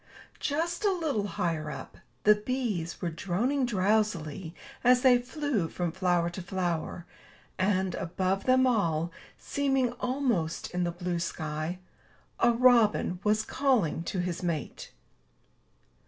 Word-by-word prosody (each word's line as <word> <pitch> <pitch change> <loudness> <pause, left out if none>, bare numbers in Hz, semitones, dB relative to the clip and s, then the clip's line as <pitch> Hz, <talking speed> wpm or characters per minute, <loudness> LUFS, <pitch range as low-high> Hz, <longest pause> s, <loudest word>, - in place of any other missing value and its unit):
Just 335 +6 -1
a 410 - +4
little 300 - -1
higher 165 -5 -2
up, - - -8 0.2
the 210 - +7
bees 210 -7 -3
were 170 - -1
droning 230 - 0
drowsily 190 -6 0 0.3
as 250 +1 +5
they 250 -2 +6
flew 250 - -1
from 175 0 -2
flower 175 -1 +1
to 185 - -6
flower; 175 -2 -3 0.5
and, 190 -1 +1
above 185 +3 -1
them 260 0 +5
all, 170 -9 +1 0.3
seeming 270 -3 0
almost 245 - -1
in 180 0 0
the 175 - -1
blue 175 0 -3
sky, 155 0 -3 0.6
a 240 - +5
robin 230 -6 +4
was 215 +1 +2
calling 245 - +1
to 190 - -3
his 175 -1 -2
mate. 165 -6 -3
190 Hz, 125 wpm, -29 LUFS, 170-250 Hz, 0.6 s, the